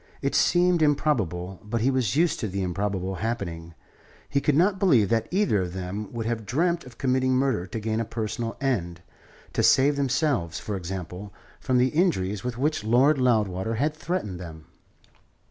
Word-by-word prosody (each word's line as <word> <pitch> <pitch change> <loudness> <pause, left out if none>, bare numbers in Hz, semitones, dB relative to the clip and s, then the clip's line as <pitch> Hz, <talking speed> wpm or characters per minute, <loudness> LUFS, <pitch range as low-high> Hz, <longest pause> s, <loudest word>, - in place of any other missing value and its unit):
It 140 - 0
seemed 175 -1 +3
improbable; 100 - 0
but 110 +2 -2
he 130 +4 +3
was 130 -3 0
used 165 +1 +2
to 110 - -2
the 100 0 -3
improbable 95 +1 -2
happening. 85 -8 -4 0.5
He 140 - 0
could 150 - +2
not 190 +5 +3
believe 130 - +4
that 115 -1 +1
either 185 - +2
of 90 -1 -4
them 95 +3 -5
would 115 -2 -4
have 115 -1 -2
dreamt 170 - 0
of 125 -2 -13
committing 130 0 +1
murder 130 -9 0
to 110 +4 -5
gain 110 +1 -2
a - - 0
personal 115 0 -4
end 85 -11 -2 0.5
to - - +1
save 140 +2 +4
themselves, 135 - 0
for 105 - -4
example, 90 +1 -6 0.3
from 130 -1 0
the 125 +1 +3
injuries 105 - 0
with 125 -1 -4
which 150 -2 0
Lord 130 +6 +4
Loudwater 110 -4 +1
had 145 +6 0
threatened 155 - -3
them. 80 -3 -9
115 Hz, 175 wpm, -25 LUFS, 95-140 Hz, 0.5 s, believe